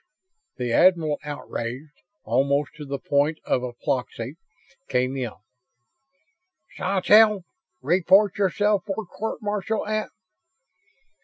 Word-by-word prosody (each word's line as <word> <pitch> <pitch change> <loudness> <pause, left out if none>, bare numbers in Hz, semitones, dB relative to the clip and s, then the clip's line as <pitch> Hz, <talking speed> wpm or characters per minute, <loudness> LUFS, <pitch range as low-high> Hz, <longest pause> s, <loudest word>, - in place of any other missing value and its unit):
The 125 -2 -2
admiral, 165 -4 +4
outraged 145 -1 -6 0.2
almost 140 +5 +1
to 150 - -7
the 140 0 -3
point 145 +3 +1
of 125 - 0
apoplexy, 125 +1 -3 0.5
came 130 +1 0
in. 130 -3 -2 1.5
"Sawtelle, 205 +1 +4 0.4
report 185 +6 +4
yourself 205 0 +2
for 205 +2 -3
court 220 +3 -5
martial 210 +1 -2
at 215 0 -2
155 Hz, 95 wpm, -24 LUFS, 135-200 Hz, 1.5 s, admiral